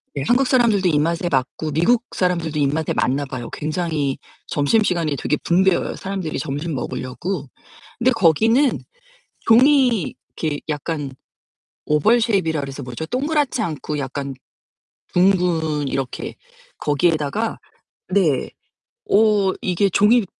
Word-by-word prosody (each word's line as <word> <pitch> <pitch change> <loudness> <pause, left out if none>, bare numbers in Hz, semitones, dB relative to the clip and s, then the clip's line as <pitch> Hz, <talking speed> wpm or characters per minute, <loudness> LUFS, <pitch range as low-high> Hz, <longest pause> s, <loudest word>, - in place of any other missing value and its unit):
네 140 - -2
한국 255 +2 +3
사람들도 225 -7 +3
입맛에 165 +3 +1
맞고, 135 +3 -1
미국 200 +11 +2
사람들도 170 -4 0
입맛에 145 +3 0
맞나 140 +3 0
봐요. 130 -3 -6
굉장히 155 -3 -2 0.3
점심시간이 165 0 +1
되게 150 +2 -1
붐벼요, 185 +1 +2
사람들이 190 -5 -4
점심 150 +3 -3
먹으려고. 140 +5 -4 0.5
근데 255 +2 +3
거기는 225 - +3 0.6
종이 250 - +4 0.3
이렇게 150 -3 -1
약간 150 -1 -3 0.8
oval 150 +11 +3
shape이라 190 -9 +1
그래서 140 0 -6
뭐죠? 125 +4 -6
동그랗지 280 - 0
않고 155 -5 -3
약간 140 0 -4 0.8
둥근 175 -6 +2
이렇게 135 -1 -4 0.4
거기에다가 160 +7 0 0.5
네. 180 -8 +1 0.6
오 205 -2 +3
이게 185 +2 +1
종이 210 +4 +4
170 Hz, 295 characters per minute, -21 LUFS, 145-210 Hz, 0.8 s, 종이